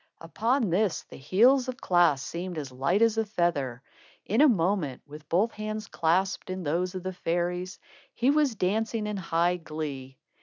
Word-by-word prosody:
Upon 225 Hz, +6 st, 0 dB
this, 195 Hz, 0 st, +1 dB
the -, -, -14 dB
heels 245 Hz, -, +4 dB
of 255 Hz, -1 st, -4 dB
Klaas 175 Hz, -7 st, +3 dB
seemed 175 Hz, +2 st, -5 dB
as 140 Hz, -4 st, -5 dB
light 140 Hz, -, +1 dB
as 225 Hz, -1 st, +3 dB
a -, -, +2 dB
feather. 145 Hz, -, -1 dB, 0.4 s
In 220 Hz, +7 st, +2 dB
a 305 Hz, -, +7 dB
moment, 175 Hz, -, 0 dB
with 150 Hz, +1 st, -12 dB
both 200 Hz, +7 st, +2 dB
hands 215 Hz, 0 st, -5 dB
clasped 185 Hz, +4 st, 0 dB
in 185 Hz, 0 st, -4 dB
those 175 Hz, +5 st, -1 dB
of 185 Hz, -, -5 dB
the 185 Hz, 0 st, -4 dB
fairies, 180 Hz, +1 st, -2 dB, 0.4 s
he 250 Hz, +3 st, +3 dB
was 290 Hz, -5 st, +2 dB
dancing 215 Hz, +3 st, -1 dB
in 210 Hz, -1 st, -3 dB
high 175 Hz, 0 st, +1 dB
glee. 145 Hz, -5 st, -6 dB
180 Hz, 175 wpm, -27 LUFS, 165-215 Hz, 0.4 s, a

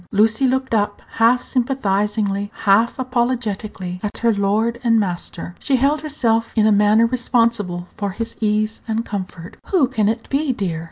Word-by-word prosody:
Lucy 220 Hz, +5 st, +3 dB
looked 260 Hz, -1 st, -1 dB
up, 205 Hz, -1 st, 0 dB, 0.2 s
half 240 Hz, +2 st, +4 dB
sympathizingly, 210 Hz, -5 st, -1 dB
half 220 Hz, +3 st, +3 dB
apologetically, 230 Hz, -7 st, -2 dB
at 210 Hz, -, -4 dB
her 230 Hz, -1 st, +2 dB
lord 215 Hz, +4 st, 0 dB
and 230 Hz, -2 st, +3 dB
master. 175 Hz, -3 st, -4 dB
She 275 Hz, -, +1 dB
held 280 Hz, +4 st, +2 dB
herself 230 Hz, -7 st, 0 dB
in 215 Hz, -2 st, +3 dB
a 215 Hz, -, +4 dB
manner 210 Hz, +2 st, +4 dB
responsible 230 Hz, -7 st, 0 dB
for 200 Hz, -1 st, -2 dB
his 230 Hz, +4 st, -5 dB
ease 215 Hz, 0 st, 0 dB
and 225 Hz, +1 st, -1 dB
comfort. 185 Hz, -4 st, -6 dB
"Who 345 Hz, -9 st, +3 dB
can 220 Hz, -5 st, +1 dB
it 230 Hz, +1 st, -3 dB
be, 280 Hz, -1 st, +1 dB
dear?" 180 Hz, -8 st, -3 dB
225 Hz, 160 wpm, -20 LUFS, 205-245 Hz, 0.2 s, half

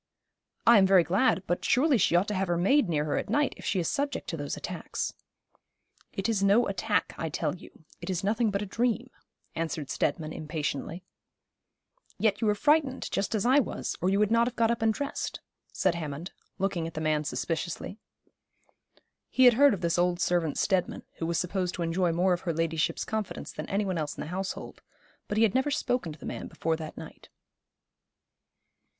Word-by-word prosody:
'I 235 Hz, -2 st, +8 dB
am 190 Hz, -, +5 dB
very 190 Hz, -2 st, +6 dB
glad; 190 Hz, -, +2 dB
but 175 Hz, -, -1 dB
surely 270 Hz, 0 st, +3 dB
she 175 Hz, -, +3 dB
ought 180 Hz, +4 st, +3 dB
to -, -, -1 dB
have 190 Hz, -1 st, 0 dB
her 175 Hz, 0 st, +1 dB
maid 200 Hz, +5 st, +3 dB
near 150 Hz, -2 st, +1 dB
her 150 Hz, -, -1 dB
at -, -, -3 dB
night, 295 Hz, 0 st, +2 dB
if -, -, -13 dB
she 190 Hz, -, 0 dB
is 170 Hz, -, -1 dB
subject 285 Hz, +1 st, -2 dB
to -, -, -2 dB
those -, -, -4 dB
attacks.' -, -, -4 dB, 1.0 s
'It 195 Hz, -, -2 dB
is 220 Hz, -4 st, +1 dB
no 205 Hz, +5 st, +4 dB
attack, -, -, 0 dB
I -, -, -2 dB
tell -, -, -1 dB
you. -, -, -16 dB, 0.2 s
It -, -, -6 dB
is 185 Hz, -1 st, -1 dB
nothing 220 Hz, +3 st, +2 dB
but 200 Hz, 0 st, -1 dB
a -, -, -3 dB
dream,' 240 Hz, +4 st, -1 dB, 0.4 s
answered 160 Hz, -4 st, -3 dB
Steadman 155 Hz, +2 st, -1 dB
impatiently. 155 Hz, +2 st, -4 dB, 1.1 s
'Yet 215 Hz, -1 st, +1 dB
you 225 Hz, -, +2 dB
were 210 Hz, -, +3 dB
frightened, 290 Hz, +2 st, +2 dB
just 205 Hz, +3 st, -1 dB
as 215 Hz, -, 0 dB
I 260 Hz, +4 st, +6 dB
was, 270 Hz, -, -2 dB
or 180 Hz, -, +2 dB
you 195 Hz, -, +2 dB
would 210 Hz, +1 st, +2 dB
not 230 Hz, +1 st, +4 dB
have 250 Hz, -, -4 dB
got 230 Hz, 0 st, +3 dB
up 235 Hz, 0 st, -2 dB
and 225 Hz, 0 st, +4 dB
dressed,' 280 Hz, +6 st, -4 dB, 0.3 s
said 185 Hz, -, +1 dB
Hammond, 160 Hz, +1 st, -5 dB, 0.3 s
looking 185 Hz, -4 st, -1 dB
at 165 Hz, -, -9 dB
the -, -, -2 dB
man 155 Hz, -1 st, +1 dB
suspiciously. 165 Hz, -, -3 dB, 1.3 s
He 260 Hz, -, +4 dB
had 245 Hz, -, +9 dB
heard 280 Hz, -1 st, +5 dB
of 185 Hz, -, -10 dB
this 170 Hz, 0 st, +1 dB
old 175 Hz, 0 st, +2 dB
servant 175 Hz, -4 st, +1 dB
Steadman, 190 Hz, -3 st, 0 dB, 0.2 s
who 165 Hz, -, -1 dB
was 170 Hz, -1 st, 0 dB
supposed 180 Hz, +1 st, -1 dB
to 175 Hz, -, -2 dB
enjoy 170 Hz, +1 st, +1 dB
more 180 Hz, +2 st, +2 dB
of 175 Hz, -, -2 dB
her 170 Hz, -3 st, -2 dB
ladyship's 165 Hz, -1 st, 0 dB
confidence 220 Hz, -2 st, -4 dB
than -, -, -7 dB
any 200 Hz, +1 st, 0 dB
one 185 Hz, -3 st, -1 dB
else 150 Hz, -2 st, -3 dB
in -, -, -5 dB
the -, -, -5 dB
household; 190 Hz, +1 st, -5 dB, 0.5 s
but 205 Hz, -, -2 dB
he 225 Hz, -, +5 dB
had 215 Hz, -3 st, +3 dB
never 265 Hz, +3 st, +2 dB
spoken 250 Hz, -, -1 dB
to 150 Hz, -, -10 dB
the -, -, -11 dB
man -, -, -5 dB
before 165 Hz, 0 st, -1 dB
that 160 Hz, -1 st, -8 dB
night. -, -, -11 dB
190 Hz, 205 wpm, -28 LUFS, 165-225 Hz, 1.3 s, had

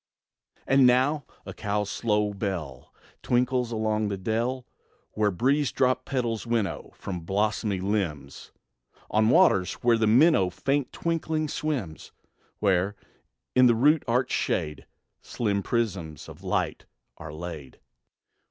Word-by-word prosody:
And 135 Hz, -1 st, +5 dB
now 130 Hz, +4 st, +2 dB, 0.2 s
a -, -, -7 dB
cow's 105 Hz, 0 st, -2 dB
slow 105 Hz, -2 st, 0 dB
bell 90 Hz, -, -5 dB, 0.3 s
Tinkles 125 Hz, 0 st, +1 dB
along 110 Hz, -1 st, 0 dB
the 100 Hz, -1 st, -3 dB
dell; 115 Hz, +6 st, -2 dB, 0.5 s
Where 105 Hz, -1 st, +1 dB
breeze 135 Hz, -, +1 dB
dropped 130 Hz, 0 st, +1 dB
petals 120 Hz, -4 st, -2 dB
winnow 115 Hz, -4 st, -1 dB
From 90 Hz, -2 st, -5 dB
blossomy 100 Hz, +2 st, -1 dB
limbs 90 Hz, -8 st, -3 dB, 0.6 s
On 110 Hz, +1 st, +3 dB
waters, 125 Hz, -, +4 dB
where 120 Hz, -1 st, +4 dB
the 110 Hz, -, +2 dB
minnow, 120 Hz, -, +5 dB
Faint 135 Hz, +9 st, -1 dB
twinkling, 160 Hz, -2 st, -2 dB
swims; 140 Hz, -, -4 dB, 0.5 s
Where, 100 Hz, 0 st, +1 dB, 0.6 s
in 125 Hz, 0 st, +6 dB
the 120 Hz, -, +4 dB
root 150 Hz, +7 st, +4 dB
arched 125 Hz, +3 st, +1 dB
shade, 75 Hz, -1 st, -2 dB, 0.3 s
Slim 100 Hz, -4 st, -1 dB
prisms 95 Hz, -, -3 dB
of -, -, -12 dB
light -, -, -2 dB, 0.3 s
are 75 Hz, -1 st, -8 dB
laid. 80 Hz, -4 st, -8 dB
110 Hz, 125 wpm, -26 LUFS, 95-125 Hz, 0.6 s, in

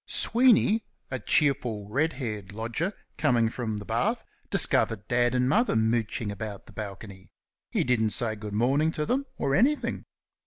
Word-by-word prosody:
Sweeney, 230 Hz, -3 st, +4 dB, 0.3 s
a 130 Hz, -, -2 dB
cheerful, 120 Hz, -10 st, +1 dB
red 150 Hz, +9 st, 0 dB
haired 105 Hz, -7 st, -5 dB
lodger, 115 Hz, -, -2 dB, 0.3 s
coming 115 Hz, -2 st, +3 dB
from 110 Hz, -2 st, -4 dB
the 105 Hz, -, -7 dB
bath, -, -, 0 dB, 0.3 s
discovered 105 Hz, -2 st, +2 dB
Dad 120 Hz, 0 st, +2 dB
and 125 Hz, 0 st, +2 dB
Mother 225 Hz, -, +2 dB
mooching 110 Hz, -1 st, 0 dB
about 100 Hz, 0 st, -6 dB
the -, -, -16 dB
balcony. 100 Hz, -2 st, -8 dB, 0.4 s
He -, -, 0 dB
didn't 115 Hz, -3 st, +1 dB
say 110 Hz, 0 st, 0 dB
"Good 105 Hz, -1 st, -7 dB
morning" 140 Hz, +8 st, +2 dB
to 150 Hz, -, -2 dB
them, 275 Hz, -, -1 dB
or 135 Hz, -, 0 dB
anything. 275 Hz, -, +1 dB
120 Hz, 155 wpm, -27 LUFS, 105-145 Hz, 0.4 s, Sweeney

